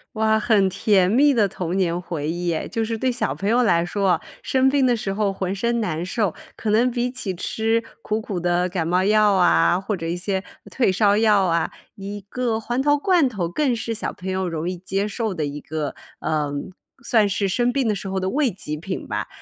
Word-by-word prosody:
哇， 220 Hz, 0 st, +2 dB
很 210 Hz, -4 st, +3 dB
甜 190 Hz, -1 st, +3 dB
蜜 280 Hz, +6 st, +5 dB
的 220 Hz, -5 st, +3 dB
童 180 Hz, -2 st, -4 dB
年 175 Hz, -3 st, +1 dB
回 160 Hz, -4 st, -4 dB
忆 175 Hz, 0 st, -1 dB
哎， 155 Hz, -, -3 dB
就 225 Hz, -1 st, -2 dB
是 225 Hz, +1 st, -2 dB
对 260 Hz, +2 st, +1 dB
小 245 Hz, -, -1 dB
朋 200 Hz, -, -2 dB
友 245 Hz, +2 st, +4 dB
来 170 Hz, -7 st, +3 dB
说 195 Hz, +2 st, 0 dB
哦， -, -, +1 dB, 0.2 s
生 265 Hz, 0 st, +3 dB
病 275 Hz, -1 st, +3 dB
的 245 Hz, -1 st, +3 dB
时 210 Hz, -3 st, -3 dB
候 200 Hz, 0 st, 0 dB
浑 190 Hz, 0 st, -3 dB
身 235 Hz, +4 st, 0 dB
难 170 Hz, -4 st, -2 dB
受， 200 Hz, -2 st, -1 dB, 0.2 s
可 220 Hz, -, -3 dB
能 235 Hz, +4 st, +3 dB
比 245 Hz, 0 st, -1 dB
起 235 Hz, -7 st, -4 dB
吃 225 Hz, +5 st, -1 dB, 0.2 s
苦 215 Hz, +1 st, -1 dB
苦 200 Hz, -4 st, -4 dB
的 175 Hz, +1 st, +1 dB
感 170 Hz, -3 st, -2 dB
冒 180 Hz, +2 st, +2 dB
药 210 Hz, 0 st, +4 dB
啊， 180 Hz, -1 st, +4 dB
或 195 Hz, +1 st, -3 dB
者 165 Hz, -, -6 dB
一 170 Hz, +1 st, -1 dB
些 190 Hz, +1 st, -2 dB, 0.3 s
退 245 Hz, -7 st, +2 dB
烧 205 Hz, +2 st, +3 dB
药 210 Hz, -3 st, +4 dB
啊， 170 Hz, -2 st, +1 dB, 0.2 s
一 200 Hz, +1 st, -6 dB
个 235 Hz, -2 st, -1 dB
黄 240 Hz, +3 st, -2 dB
桃 290 Hz, +2 st, +3 dB
罐 335 Hz, 0 st, +3 dB
头 195 Hz, -9 st, -3 dB
更 260 Hz, -, +1 dB
是 225 Hz, 0 st, -3 dB
小 -, -, -4 dB
朋 190 Hz, -, -7 dB
友 190 Hz, 0 st, -1 dB
容 165 Hz, 0 st, -3 dB
易 180 Hz, -, -4 dB
接 195 Hz, +3 st, -2 dB
受 215 Hz, 0 st, -2 dB
的 160 Hz, -4 st, -2 dB
一 145 Hz, +1 st, -5 dB
个， 155 Hz, -1 st, -4 dB, 0.2 s
呃， 150 Hz, -2 st, -1 dB, 0.5 s
算 220 Hz, -3 st, +3 dB
是 200 Hz, 0 st, 0 dB
生 245 Hz, +5 st, +1 dB
病 270 Hz, -4 st, +1 dB
的 210 Hz, -, +1 dB
时 195 Hz, -, -6 dB
候 190 Hz, 0 st, -2 dB
的 185 Hz, 0 st, -1 dB
慰 275 Hz, +1 st, +1 dB
藉 155 Hz, -5 st, -5 dB
品 185 Hz, +4 st, -5 dB
吧。 -, -, -3 dB
200 Hz, 245 characters per minute, -22 LUFS, 180-230 Hz, 0.5 s, 蜜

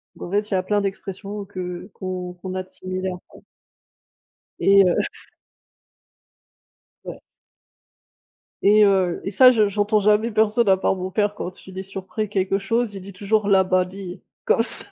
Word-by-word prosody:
donc -, -, -8 dB
en -, -, -11 dB
fait 205 Hz, +1 st, 0 dB
il -, -, -3 dB
y -, -, +3 dB
a 185 Hz, -, -1 dB
plein 205 Hz, +2 st, +1 dB
d'expressions 195 Hz, +1 st, -5 dB
que 185 Hz, 0 st, -7 dB
qu'on 185 Hz, -1 st, -5 dB
qu'on 185 Hz, +1 st, -7 dB
a 185 Hz, -, -2 dB
de -, -, -23 dB
similaires, 185 Hz, 0 st, -5 dB
quoi -, -, -17 dB, 1.2 s
et 195 Hz, 0 st, +6 dB
heu 180 Hz, -, +3 dB, 2.1 s
Ouais. -, -, -8 dB, 1.4 s
Et 210 Hz, +1 st, +6 dB
heu, 190 Hz, -3 st, +2 dB
et 195 Hz, -, -2 dB
ça 255 Hz, +5 st, +7 dB
je 215 Hz, -4 st, +3 dB
j'entends 210 Hz, +1 st, +1 dB
jamais 210 Hz, +3 st, +3 dB
personne 220 Hz, +1 st, +2 dB
à 190 Hz, -, +6 dB
part 190 Hz, -, +1 dB
mon 185 Hz, 0 st, -5 dB
père 205 Hz, +1 st, 0 dB
quand 185 Hz, -2 st, -8 dB
il 190 Hz, 0 st, -9 dB
est -, -, -3 dB
surpris 195 Hz, +2 st, -5 dB
quelque 195 Hz, -1 st, 0 dB
chose, 225 Hz, +2 st, -1 dB
il 195 Hz, -, -7 dB
dit 195 Hz, +2 st, -10 dB
toujours 205 Hz, +2 st, 0 dB
«labadi!» 185 Hz, -1 st, +1 dB, 0.2 s
comme 465 Hz, -1 st, +2 dB
ça. -, -, -9 dB
195 Hz, 170 wpm, -22 LUFS, 185-210 Hz, 2.1 s, ça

